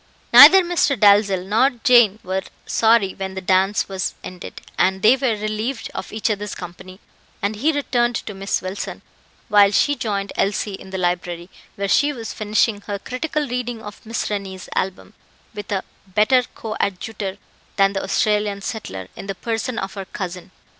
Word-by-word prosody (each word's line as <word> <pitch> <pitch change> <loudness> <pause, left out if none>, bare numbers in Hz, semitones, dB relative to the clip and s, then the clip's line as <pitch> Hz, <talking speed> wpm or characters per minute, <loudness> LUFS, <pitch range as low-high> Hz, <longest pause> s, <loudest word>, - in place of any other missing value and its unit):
Neither 385 -1 +10
Mr. 340 -6 +1
Dalzell 200 -3 +4
nor 225 +7 +3
Jane 240 -7 +6
were 190 +1 -2 0.2
sorry 220 -4 +3
when 190 0 -6
the - - -3
dance 190 +2 +2
was 190 -2 -3
ended 180 -1 -9
and 190 +1 +1
they 225 +4 +7
were 260 -4 0
relieved 215 +4 -3
of - - -6
each 220 +1 -1
other's 210 0 -4
company; 185 +1 -10 0.4
and 200 +2 -2
he 300 +9 +2
returned 245 -5 0
to 210 - -4
Miss 195 0 -2
Wilson, 185 +2 -5 0.4
while 205 -1 +6
she 285 +8 +2
joined 200 -6 -3
Elsie 205 +1 0
in 190 - -9
the 190 - -4
library, 175 0 -2 0.2
where 200 0 -2
she 290 +8 +3
was 230 -4 -6
finishing 215 0 0
her 205 -1 -2
critical 295 +7 -3
reading 245 -2 -4
of 210 0 -10
Miss 225 +1 -3
Rennie's 195 -3 -5
album, 190 +2 -3 0.4
with 205 -2 -8
a 195 -2 -1 0.2
better 215 +7 +3
coadjutor 200 -2 -4 0.4
than 195 0 +3
the 195 - -2
Australian 210 -1 0
settler, 95 - -5
in - - -9
the 195 - -3
person 230 +3 -3
of 195 0 -4
her 195 -2 -6
cousin. 180 -2 -6
205 Hz, 165 wpm, -21 LUFS, 190-225 Hz, 0.4 s, Neither